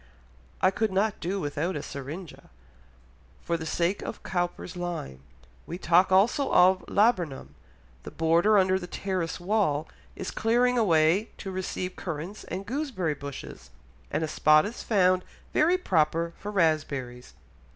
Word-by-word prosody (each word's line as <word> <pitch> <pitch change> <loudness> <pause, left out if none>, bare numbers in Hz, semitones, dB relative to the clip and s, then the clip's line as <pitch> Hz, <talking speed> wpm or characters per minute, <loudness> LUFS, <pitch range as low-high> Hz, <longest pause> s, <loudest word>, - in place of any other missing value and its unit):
I 185 - +5
could 215 +1 -1
not 200 +2 0
do 190 +4 -2
without 150 +2 -2
a 145 - -4
syringa, 145 +5 -8 0.9
for 170 - -1
the 160 -1 -4
sake 175 +5 0
of - - -7
Cowper's 175 -1 -3
line. 175 - -5 0.5
We 175 - -5
talk 180 +1 +3
also 225 +9 +3
of 185 +1 +5
a - - -11
laburnum. 175 - +1 0.5
The - - -8
border 170 +6 +3
under 190 -1 +3
the 180 - -7
terrace 185 -3 -3
wall 175 -6 0 0.3
is 190 - -5
clearing 245 +2 +2
away 180 -2 +3
to 195 - -6
receive 185 0 -4
currants 175 +4 -6
and 190 +2 -5
gooseberry 240 - -2
bushes, 140 -1 -9 0.4
and 160 - -1
a - - -1
spot 155 0 +4
is 225 +4 -6
found 185 -4 +3 0.3
very 340 +4 +4
proper 165 - +1
for 205 - -7
raspberries." 145 -9 -1
180 Hz, 145 wpm, -27 LUFS, 160-200 Hz, 0.9 s, I